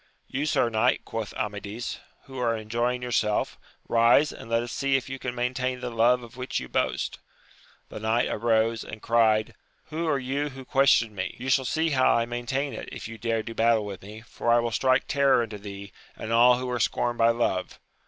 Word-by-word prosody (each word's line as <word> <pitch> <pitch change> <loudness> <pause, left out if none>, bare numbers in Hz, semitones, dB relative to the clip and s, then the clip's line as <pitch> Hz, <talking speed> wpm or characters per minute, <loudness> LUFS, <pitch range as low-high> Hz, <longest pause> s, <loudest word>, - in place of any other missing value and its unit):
You 145 +3 -3
sir 125 - +2
knight, 115 +3 +1
quoth 115 -2 -4
Amadis, 105 +2 -4 0.2
who 130 -2 -9
are 115 -2 +1
enjoying 120 +3 -1
yourself, 110 -3 0 0.3
rise, 120 +6 +4
and - - -11
let 115 0 +1
us 120 - -6
see 140 0 0
if 135 0 0
you 135 0 -5
can 125 -1 -4
maintain 125 +1 -1
the 125 -1 -5
love 120 +2 +3
of 120 +1 -12
which 125 0 -2
you 65 - -7
boast. - - -1 0.7
The - - -7
knight 110 +2 +1
arose, 115 0 +1
and 110 - -8
cried. 110 -2 +2 0.4
Who 165 +2 -2
are 150 -3 +2
you 135 +3 -2
who 135 -1 -10
ques 135 +1 +3
tion 115 -2 +3
me? 95 -2 -4
you 130 +2 -5
shall 130 0 +3
see 160 +4 0
how 130 -2 +4
I 115 - +2
maintain 120 +4 -3
it, - - -7
if - - -7
you 115 0 -9
dare 115 -1 -1
do 115 - -7
battle 115 -1 +2
with 100 -2 -7
me, 105 +3 -10
for 115 +1 -4
I 120 - +6
will 120 0 0
strike 130 +2 +2
terror 140 -4 +3
into 105 -2 -7
thee, 100 -1 -9 0.2
and 110 - -4
all 120 +1 +6
who 130 0 -4
are 125 - -1
scorned 120 +2 0
by 115 0 +5
love. 115 -6 -1
120 Hz, 210 wpm, -26 LUFS, 110-130 Hz, 0.7 s, I